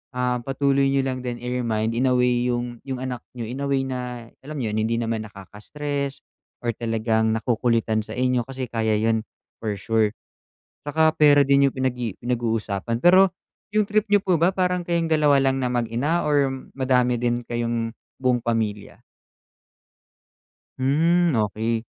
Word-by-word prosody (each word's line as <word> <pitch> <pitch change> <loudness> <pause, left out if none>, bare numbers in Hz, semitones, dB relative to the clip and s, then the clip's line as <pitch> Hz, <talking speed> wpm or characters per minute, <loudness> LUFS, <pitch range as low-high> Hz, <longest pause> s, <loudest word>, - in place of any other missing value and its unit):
ah, 125 0 0
patuloy 135 +1 +1
niyo 135 0 +2
lang 130 -1 -2
din, 125 -1 -4
i-remind, 115 -3 -1
in 125 +3 +1
a 125 - +2
way 125 0 +2
yung 120 -1 -2
yung 130 - -3
anak 125 -2 -4 0.2
n'yo 115 - -4
in 125 +5 -6
a 140 - -1
way 135 -1 +2
na 130 -1 -3 0.4
alam 150 +3 -7
nyo 115 -6 -2
'yon, 110 - -1
hindi 115 +1 0
naman 115 -1 -1
nakaka-stress 140 +9 -5 0.4
or 120 - +1
talagang 110 -1 0
nakukulitan 115 -2 +1
sa 110 +1 -8
inyo 125 0 +1
kasi 135 -1 -5
kaya 110 -2 +1
yun 110 +1 +1 0.4
for 110 -2 -2
sure. 110 +2 +1 0.8
Tsaka 160 +1 +3
pera 145 -1 +6
din 140 0 +4
yung - - -4
pinag-i 125 -4 -2
pinag-uusapan. 115 -2 -2
Pero 185 +1 +6 0.4
yung 215 - +5
trip 215 +1 +1
niyo 205 -1 +4
po 180 -3 +2
ba, 175 +4 +3
parang 180 -1 0
kayong 170 -1 0
dalawa 145 -3 +4
lang 135 0 +1
na 125 - 0
mag-ina 125 +7 0
or 145 -2 +3 0.3
madami 125 -2 +2
din 120 0 0
kayong 115 -1 -2 0.2
buong 125 -2 +1
pamilya? 110 -3 -3 1.8
Hmm, 165 +4 +2
okey. 110 +1 -1
125 Hz, 160 wpm, -23 LUFS, 115-140 Hz, 1.8 s, pera